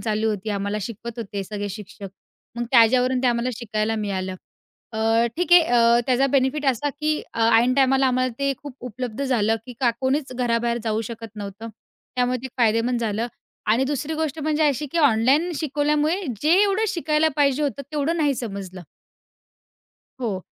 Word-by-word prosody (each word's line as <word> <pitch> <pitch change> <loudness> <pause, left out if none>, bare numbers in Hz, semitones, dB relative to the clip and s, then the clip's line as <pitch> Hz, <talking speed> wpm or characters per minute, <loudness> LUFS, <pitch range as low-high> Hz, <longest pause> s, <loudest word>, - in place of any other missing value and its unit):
चालू 220 0 0
होती. 210 +1 -4
आम्हाला 200 +1 -2
शिकवत 230 +3 -7
होते 200 -3 -4
सगळे 205 +1 -4
शिक्षक, 200 0 -8 0.5
मग 240 - -2
त्याच्यावरून 250 +1 +4
ते - - +2
आम्हाला 240 0 +1
शिकायला 215 -1 -2
मिळालं. 190 -3 -3 0.6
अ, 225 +1 +2
ठीक 350 +1 0
आहे, 350 - +10
अ, 235 -4 +4
त्याचा 260 +1 +3
बेनिफिट 275 +2 +1
असा 265 +2 +1
की, 305 0 0
अ, - - -3 0.2
ऐन 245 +2 +2
टाईमाला 270 0 +3
आम्हाला 255 0 +1
ते 275 0 +1
खूप 285 -3 -8
उपलब्ध 250 +1 -5
झालं 225 -5 +1
की, 250 - -8
का 245 -3 +4
कोणीच 265 +1 0
घराबाहेर 235 -1 0
जाऊ 220 0 0
शकत 225 -1 -9
नव्हतं. 205 +2 -7 0.5
त्यामुळे 250 0 +1
ते 265 - -5
फायदेमंद 235 +1 +2
झालं 225 0 -1 0.5
आणि 255 +4 +2
दुसरी 290 +2 -2
गोष्ट 315 -1 -2
म्हणजे 310 +1 0
अशी 285 +2 -2
की 340 - 0
ऑनलाईन 280 +4 +3
शिकवल्यामुळे, 300 +3 0 0.2
जेवढं 390 +7 +3
शिकायला 315 -3 +1
पाहिजे 285 0 +2
होतं 280 -1 -2
तेवढं 305 +3 0
नाही 295 -4 +2
समजलं. 195 -6 -6 1.4
हो 215 -6 -2
250 Hz, 165 wpm, -23 LUFS, 220-285 Hz, 1.4 s, आहे